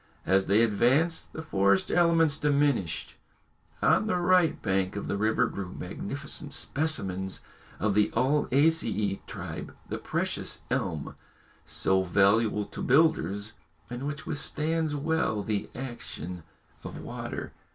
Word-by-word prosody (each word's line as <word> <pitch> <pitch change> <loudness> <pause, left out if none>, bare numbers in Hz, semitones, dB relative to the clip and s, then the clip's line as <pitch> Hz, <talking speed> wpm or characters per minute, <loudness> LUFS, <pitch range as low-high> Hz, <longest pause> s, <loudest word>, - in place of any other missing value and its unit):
As 95 +2 +3
they 105 +4 +5
advanced 130 - +2
the 160 - -6
forest 100 -8 +2
element 165 -3 +4
diminished. 140 - +1 0.7
On 215 - +4
the 185 - +1
right 180 -2 +3
bank 95 -1 0
of 100 - -4
the - - -1
river 110 +2 +2
grew 95 -2 -5
magnificent 140 - -4
specimens 95 - -1 0.4
of 105 0 +1
the 105 +1 +3
ulmaceæ 135 -5 +2
tribe, - - -7
the - - -3
precious - - -2
elm, - - -2 0.5
so 95 0 +2
valuable 105 +3 +3
to - - -8
builders, 125 -8 +2 0.4
and 125 +3 -4
which 145 +1 -5
withstands 155 +1 -1
well 145 -8 0
the 105 -1 -2
action 115 - -6 0.4
of - - -7
water. - - -6
120 Hz, 120 wpm, -28 LUFS, 100-155 Hz, 0.7 s, they